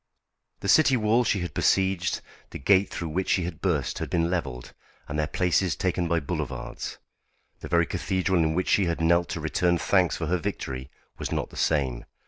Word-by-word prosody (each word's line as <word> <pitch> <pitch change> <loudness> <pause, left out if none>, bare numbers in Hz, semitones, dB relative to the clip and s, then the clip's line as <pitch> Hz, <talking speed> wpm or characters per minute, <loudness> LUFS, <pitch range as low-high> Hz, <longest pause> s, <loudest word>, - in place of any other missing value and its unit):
The - - -4
city 135 +5 +5
walls 115 +2 +2
she 100 - +1
had 90 - -4
besieged, 95 -2 +1 0.3
the - - -7
gate 100 +7 +3
through 85 - -4
which 90 +5 -2
she 95 - +2
had 85 -2 -6
burst, - - 0
had - - -4
been 85 0 +1
levelled, 70 -9 -3 0.3
and 75 +1 -3
their 75 - +1
places 90 +2 +1
taken 90 -2 -1
by 85 0 +2
boulevards. 70 - -5 0.6
The - - -7
very 85 0 +3
cathedral 95 +1 0
in 80 0 +1
which 90 - 0
she 100 - +4
had 85 -1 -1
knelt 85 +1 +3
to - - -3
return 85 +3 +1
thanks 90 0 +2
for 80 - -3
her 90 +3 +1
victory 65 -9 -4 0.3
was - - -4
not - - -2
the - - -12
same. 65 -6 0
85 Hz, 195 wpm, -26 LUFS, 80-95 Hz, 0.6 s, city